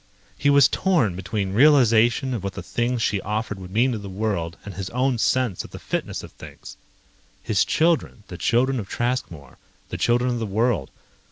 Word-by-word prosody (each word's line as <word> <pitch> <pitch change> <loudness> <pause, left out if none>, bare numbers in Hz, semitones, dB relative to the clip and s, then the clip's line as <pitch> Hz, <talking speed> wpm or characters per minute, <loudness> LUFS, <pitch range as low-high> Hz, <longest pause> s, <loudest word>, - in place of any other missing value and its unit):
He 145 - +1
was 140 -2 +6
torn 165 - +1
between 95 +1 -3
realization 125 -1 +4
of 110 -6 -4
what 100 -1 -4
the 95 -1 -7
things 120 +5 -1
she 100 0 0
offered 105 -1 -3
would 90 -1 -9
mean 120 +7 +2
to 115 - -3
the 100 -1 -8
world 95 -5 -3
and 100 - -7
his 95 +1 -5
own 125 0 0
sense 125 -6 0
of - - -11
the - - -9
fitness - - -4
of - - -11
things. - - -12 0.7
His - - +2
children, 160 -9 0
the 90 - -8
children 130 +2 +1
of 100 - -7
Traskmore, 90 - -4 0.3
the - - -5
children 120 +1 +2
of 120 - -2
the 110 - -3
world 105 - 0
115 Hz, 190 wpm, -23 LUFS, 95-125 Hz, 0.7 s, was